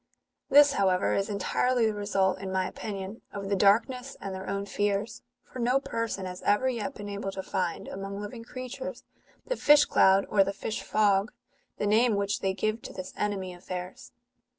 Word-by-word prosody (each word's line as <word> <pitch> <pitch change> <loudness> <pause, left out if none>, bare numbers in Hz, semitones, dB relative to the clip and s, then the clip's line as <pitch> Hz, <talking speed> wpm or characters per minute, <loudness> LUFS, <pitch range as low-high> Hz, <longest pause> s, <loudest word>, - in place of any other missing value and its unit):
This, 290 +1 +7
however, 190 -4 +2
is 200 +2 0
entirely 230 +4 +1
the 220 - +1
result, 195 -2 0
in 190 -1 -5
my 190 -1 0
opinion, 200 0 -6
of 200 -1 -5
the 200 - +2
darkness 235 +7 +2
and 195 -1 -5
their 190 0 -6
own 200 0 -2
fears; 205 +2 -1 0.2
for 255 - -10
no 250 +3 +3
person 230 -8 -3
has 180 0 -6
ever 210 +6 +2
yet 245 +1 -2
been 205 - -7
able 200 -1 -4
to 190 - -5
find, 180 -4 -2
among 195 +1 -6
living 215 +3 -7
creatures, 255 +2 -7 0.4
the - - -1
fish 295 -6 +6
cloud 190 +1 +4
or 200 -2 +4
the 195 +1 -3
fish 215 - -4
fog, 205 0 +2 0.5
the - - -1
name 220 +2 +4
which 200 0 0
they 190 0 -1
give 215 +3 -1
to - - -9
this 185 0 -7
enemy 195 -3 -2
of 175 +1 -16
theirs. 185 +8 -6
205 Hz, 190 wpm, -28 LUFS, 195-230 Hz, 0.5 s, This